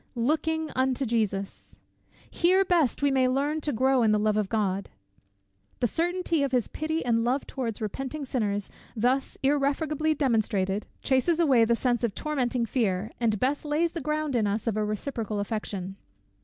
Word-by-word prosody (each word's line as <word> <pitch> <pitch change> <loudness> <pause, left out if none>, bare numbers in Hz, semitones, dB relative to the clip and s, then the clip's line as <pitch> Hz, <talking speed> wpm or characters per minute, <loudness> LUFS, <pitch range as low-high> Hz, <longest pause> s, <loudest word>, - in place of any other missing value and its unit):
LOOKING 315 +5 0
UNTO 260 +1 +1
JESUS! 210 -4 -2 0.5
Here 375 +3 +3
best 325 -7 +2
we 285 - +4
may 260 -1 +3
learn 285 +4 0
to 295 - -1
grow 260 +2 +2
in 220 -2 +4
the 210 - +3
love 210 0 +1
of 210 -2 0
God! 200 -3 -1 0.9
The - - +2
certainty 340 - 0
of 280 -2 0
his 245 -3 +2
pity 315 0 -3
and 230 -1 +2
love 255 +4 0
towards 235 -5 -4
repenting 270 +7 -4
sinners, 205 -6 -2 0.2
thus 250 +4 0
irrefragably 295 +2 +1
demonstrated, 215 -7 0 0.2
chases 280 +6 +2
away 265 -9 +5
the 235 +1 +2
sense 245 0 0
of 225 -4 0
tormenting 255 -6 -1
fear, 215 -4 -1
and 220 -4 +1
best 275 +5 0
lays 310 +3 0
the 335 - -5
ground 305 -1 -1
in 220 -3 +2
us 205 +2 -2
of 225 -3 0
a 215 - 0
reciprocal 215 0 -3
affection. 200 -2 -4
255 Hz, 170 wpm, -27 LUFS, 215-295 Hz, 0.9 s, away